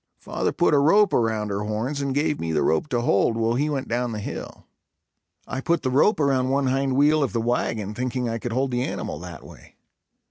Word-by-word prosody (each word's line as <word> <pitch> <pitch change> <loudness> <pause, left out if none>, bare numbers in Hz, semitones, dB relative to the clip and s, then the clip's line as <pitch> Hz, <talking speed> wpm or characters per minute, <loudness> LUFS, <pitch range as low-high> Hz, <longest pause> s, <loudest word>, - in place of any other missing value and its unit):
Father - - -2
put 175 - +2
a 145 - +5
rope 200 +9 +4
around 110 -2 0
her 100 0 -2
horns 115 +7 -2
and 135 -1 -2
gave 150 0 0
me 80 - -3
the 75 - +1
rope 80 - +1
to 120 -4 0
hold, 115 0 +2
while 115 0 +1
he 145 +5 0
went 140 -3 -3
down 120 0 -1
the 105 - -4
hill. 105 - -7 0.8
I 130 - -4
put 170 +4 0
the 130 - 0
rope 150 - +3
around 135 -3 +2
one 140 +1 +1
hind 135 0 0
wheel 150 +3 +4
of 135 - -1
the 115 - 0
wagon 115 -3 -1
thinking 125 +1 -2
I 115 0 -3
could 120 - -5
hold 130 +3 0
the 125 0 0
animal - - -4
that - - -9
way. - - -15
130 Hz, 225 wpm, -24 LUFS, 115-140 Hz, 0.8 s, a